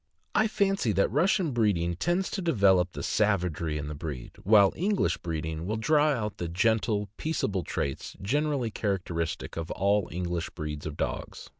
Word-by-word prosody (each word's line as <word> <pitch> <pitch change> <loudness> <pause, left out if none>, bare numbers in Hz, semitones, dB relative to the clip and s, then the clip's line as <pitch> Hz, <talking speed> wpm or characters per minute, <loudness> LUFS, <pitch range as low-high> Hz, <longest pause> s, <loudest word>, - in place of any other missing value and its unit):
' - - -42
I 215 +1 +4
fancy 195 - +1
that 100 +2 +2
Russian 180 - +2
breeding 100 -8 +1
tends 175 - 0
to 195 - -2
develop 95 - +3
the - - -5
savagery 90 -7 0
in 75 -1 -4
the 75 - -4
breed, 70 -4 -6
while 100 -1 +5
English 200 +4 +1
breed 80 -2 -3
ing 80 +2 -4
will 110 - -1
draw 150 +7 +3
out 110 -7 -1
the 85 - -2
gentle, 105 +3 +1
peaceable 105 - -1
traits 70 -5 -4
generally 140 +2 0
characteristic 90 -8 -2
of 80 0 -4
all 100 +1 +1
English 85 0 -2
breeds 75 -2 -5
of 75 - -6
dogs. - - -4
100 Hz, 170 wpm, -28 LUFS, 85-135 Hz, -, while